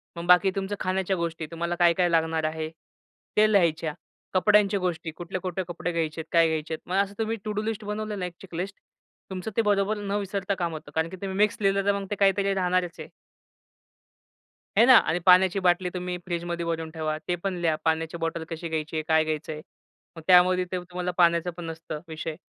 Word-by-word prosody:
मग 170 - -6
बाकी 180 +2 +6
तुमच्या 195 +1 -3
खाण्याच्या 190 +1 0
गोष्टी 165 -1 -3
तुम्हाला 170 +1 -2
काय, 170 -1 +6
काय 175 0 +2
लागणार 160 -1 +1
आहे? 155 0 -4 0.7
ते 215 0 +5
लिहायच्या. 165 -5 +2 0.4
कपड्यांच्या 200 +1 +4
गोष्टी 175 -3 -2
कुठले-कुठले 185 +1 -4
कपडे 175 0 -3
घ्यायचे 160 -1 -2
आहेत? 160 - -12
काय 165 -1 +5
घ्यायचे 160 0 -2
आहेत? 160 - -8
मग 185 - -1
असं 200 0 -9
तुम्ही 225 0 -1
टु 215 - -2
डू 210 - -1
लिस्ट 215 -1 -3
बनवलेलं 210 -2 -3
आहे 180 - -2
एक 170 - -24
चेकलिस्ट 190 +2 -5 0.5
तुमचं 190 +3 -5
ते - - +5
बरोबर 205 0 +1
न 205 -1 -5
विसरता 200 0 -2
काम 170 -3 -2
होतं. 155 0 -8
कारण, 160 +1 +1
की 190 - -8
तुम्ही 190 -1 -4
मिक्स 210 0 +3
लिहिलं 195 0 +2
तर 200 - +4
मग 195 - -6
ते 205 - 0
काहीतरी 195 0 +2
राहणारच 180 -2 0
आहे. - - -7 1.7
हे 230 - +8
ना. 255 - +8
आणि 175 - +2
पाण्याची 185 +1 +6
बाटली 180 +1 +3
तुम्ही 180 0 -3
फ्रिजमध्ये 170 -1 -3
भरून 165 -1 -2
ठेवा. 155 -1 -2
ते 175 - +1
पण 185 +2 -3
लिहा 165 -2 +2
पाण्याची 160 +1 0
बॉटल 165 0 -3
कशी 165 +1 -5
घ्यायची 160 0 -3
आहे? 155 - -1
काय 160 0 +4
घ्यायचंय? 155 0 -4 0.5
मग 165 - -9
त्यामध्ये 180 0 +6
ते 185 - -1
तुम्हाला 180 0 -4
पाण्याचा 170 0 +3
पण 175 - -6
नसतं 160 -2 -6
विषय. 160 0 -5
180 Hz, 205 wpm, -26 LUFS, 165-195 Hz, 1.7 s, हे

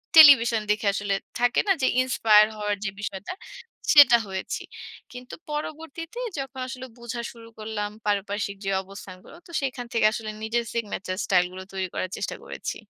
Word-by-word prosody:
Television 245 -8 +9
দেখে 210 0 0
আসলে 205 -1 -1 0.3
থাকে 245 +1 +3
না, - - +4
যে 260 - +3
ইন্সপায়ার 215 -4 +5
হওয়ার 210 0 -1
যে - - 0
বিষয়টা? 200 - -5 0.6
সেটা 280 -5 +9
হয়েছি। 190 -1 -4 0.5
কিন্তু 250 0 -10 0.2
পরবর্তীতে 320 - -6 0.2
যখন 270 -1 -6
আসলে 260 0 -7
বুঝা 235 0 -5
শুরু 230 -1 -14
করলাম 215 -1 -3 0.2
পারিপার্শ্বিক 205 0 -1
যে - - 0
অবস্থানগুলো, 190 - -12
তো 340 - -14
সেখান 255 -2 -3
থেকে 225 -2 +3
আসলে 220 -2 -5
নিজের 235 +1 -1
সিগনেচার 200 -5 -3
স্টাইল 180 -2 +3
গুলো 185 0 -8
তৈরি 190 -1 -2
করার 185 - -3
চেষ্টা - - -3
করেছি। - - -5
225 Hz, 160 wpm, -25 LUFS, 200-255 Hz, 0.6 s, Television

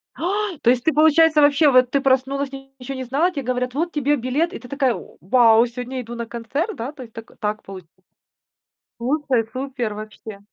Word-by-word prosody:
Ай! 390 +1 -2
То - - +2
есть, 245 0 +1
ты 320 - +3
получается 315 0 +5
вообще, 290 +1 +5
вот 255 -1 +4
ты 280 - +1
проснулась 270 +1 +1
и 270 0 -10
ничего 265 +1 -6
не 260 - -4
знала, 285 +8 +1
тебе 295 -6 -5
говорят: 250 0 -2
"Вот 330 +4 -1
тебе 295 0 +1
билет". 275 +7 -1
И - - -6
ты 245 - -13
такая: 270 -2 +1
"В - - -11
вау, 225 - +5
сегодня 250 +2 -6
иду 235 0 -8
на 235 0 -5
концерт, 255 - -3
да?" 245 +5 -5
То 290 -4 -11
есть, 230 -3 -13
так, 225 0 -10
так 210 0 -2
получ 190 -2 -10 1.1
Супер, 255 -2 0
супер, 255 -4 -3
вообще. 215 0 -9
260 Hz, 205 wpm, -21 LUFS, 235-290 Hz, 1.1 s, получается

